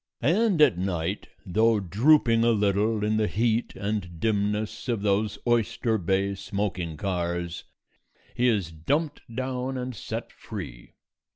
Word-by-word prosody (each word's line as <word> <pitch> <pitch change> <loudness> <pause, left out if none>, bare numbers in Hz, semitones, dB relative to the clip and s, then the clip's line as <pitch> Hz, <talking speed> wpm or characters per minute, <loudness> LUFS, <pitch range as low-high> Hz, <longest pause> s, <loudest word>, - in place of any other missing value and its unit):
And 180 - +4
at 120 -12 +4
night, 90 0 -2 0.2
though 110 +4 +3
drooping 115 - +4
a 120 - +4
little 105 +1 +1
in 110 0 +1
the 110 -1 +2
heat 115 +2 0
and 100 -5 -3
dimness 105 +2 -1
of 115 -4 -1
those 105 +1 +1
Oyster 115 -1 +1
Bay 95 +2 +1
smoking 95 -4 -3
cars, 85 -1 -2 0.7
he 125 - +2
is 100 -8 +1
dumped 145 - -1
down 130 +1 -3
and 125 -1 -4
set - - -5
free. - - -9
105 Hz, 130 wpm, -26 LUFS, 95-120 Hz, 0.7 s, And